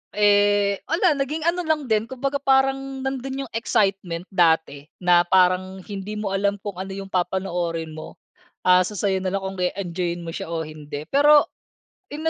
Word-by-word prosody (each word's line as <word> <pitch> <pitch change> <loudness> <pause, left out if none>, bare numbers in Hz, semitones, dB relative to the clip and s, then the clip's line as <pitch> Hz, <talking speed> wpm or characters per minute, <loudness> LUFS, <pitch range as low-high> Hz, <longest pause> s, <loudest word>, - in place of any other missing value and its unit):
Eh, 205 -1 +3
wala, 330 -1 +2
naging 300 +3 -2
ano 340 0 0
lang 310 -2 +1
din. 220 -3 0
Kumbaga, 275 +3 -2
parang 270 0 +1
nandun 270 0 -3
yung 250 - -11
excitement 195 -6 0
dati 160 -5 +2 0.2
na 175 -1 +4
parang 185 +1 +2
hindi 200 +1 -6
mo 210 -2 -3
alam 200 +1 +1
kung 200 -3 -6
ano 190 0 -5
yung 195 0 -8
papanoorin 175 -3 -2
mo. 155 0 -9 0.5
Asa 185 +3 +4
sa'yo 195 -1 0
nalang 190 +1 -2
kung 190 0 -5
e-enjoyin 180 -1 -2
mo 165 - -6
siya - - -6
o 165 -1 -3
hindi. 150 -1 -8
Pero, 290 +1 +6 0.7
in 310 +2 -6
195 Hz, 160 wpm, -23 LUFS, 180-265 Hz, 0.7 s, Pero